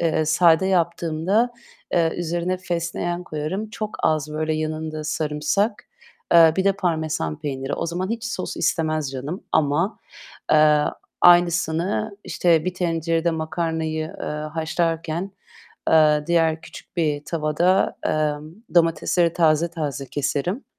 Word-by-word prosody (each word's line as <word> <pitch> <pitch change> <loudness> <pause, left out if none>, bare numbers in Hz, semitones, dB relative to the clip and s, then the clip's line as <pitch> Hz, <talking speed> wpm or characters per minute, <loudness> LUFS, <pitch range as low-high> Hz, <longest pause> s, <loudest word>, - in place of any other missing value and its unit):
Eee, 160 -2 +1
sade 160 +3 +4
yaptığımda, 175 +4 +1 0.4
eee, 165 -2 +2
üzerine 175 +2 -1
fesleğen 175 0 -3
koyarım. 180 +8 -4
Çok 215 -1 -5
az, 155 -1 +1
böyle, 155 +1 -1
yanında 155 0 -3
sarımsak, 155 +8 -1 0.5
eee, 165 -2 +8
bir 190 - +1
de 195 - +4
parmesan 160 - -2
peyniri. 135 -1 -3
O - - -3
zaman 180 +4 -3
hiç 230 0 -3
sos 225 -5 -4
istemez 155 -4 0
canım 140 +8 -6
ama, 160 +7 +1 0.5
eee, 150 -1 +5 0.4
aynısını, 175 +4 +3
işte, 170 -2 +2
bir 185 0 -2
tencerede 165 -1 0
makarnayı, 160 -1 -2
eee, - - -3
haşlarken, 160 +3 -2 0.6
eee, 150 -1 +5
diğer 165 -2 +2
küçük - - -13
bir 150 -3 0
tavada, 165 +4 +1
emm, 155 +1 -1 0.2
domatesleri 170 0 +3
taze 165 -1 +3
taze 145 -5 -4
keserim. 150 - -2
165 Hz, 120 wpm, -23 LUFS, 155-175 Hz, 0.6 s, eee